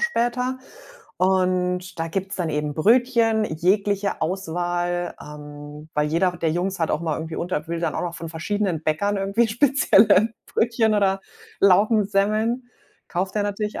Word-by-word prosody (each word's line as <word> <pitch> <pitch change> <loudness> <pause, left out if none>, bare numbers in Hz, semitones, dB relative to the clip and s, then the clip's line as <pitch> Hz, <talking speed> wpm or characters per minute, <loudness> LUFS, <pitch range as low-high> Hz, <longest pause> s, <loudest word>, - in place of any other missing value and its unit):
später. 250 -7 0 0.6
Und 185 -1 0
da 165 - -2
gibt's 195 +3 -3
dann 175 -3 -2
eben 150 0 -2
Brötchen 225 - +3
jeglicher 200 +4 0
Auswahl, 175 0 -2
ähm, 150 0 -10
weil 150 0 +1
jeder 170 +4 +1
der 165 -2 0
Jungs 185 +3 -2
hat 165 - 0
auch 150 - 0
mal 165 -2 -1
irgendwie 160 0 -6
unter 175 -3 -3
will 170 0 -2
dann 165 -3 -1
auch - - -2
noch 175 -1 -4
von 165 0 -7
verschiedenen 175 0 -2
Bäckern 200 +7 0
irgendwie 200 +4 +1
spezielle 220 -4 +4
Brötchen 225 -1 +1
oder 195 -2 +2 0.4
Laugensemmeln. 215 +4 +2 0.4
Kauft 185 +3 -2
der 210 - +1
natürlich 205 +1 -3
190 Hz, 150 wpm, -23 LUFS, 165-215 Hz, 0.6 s, spezielle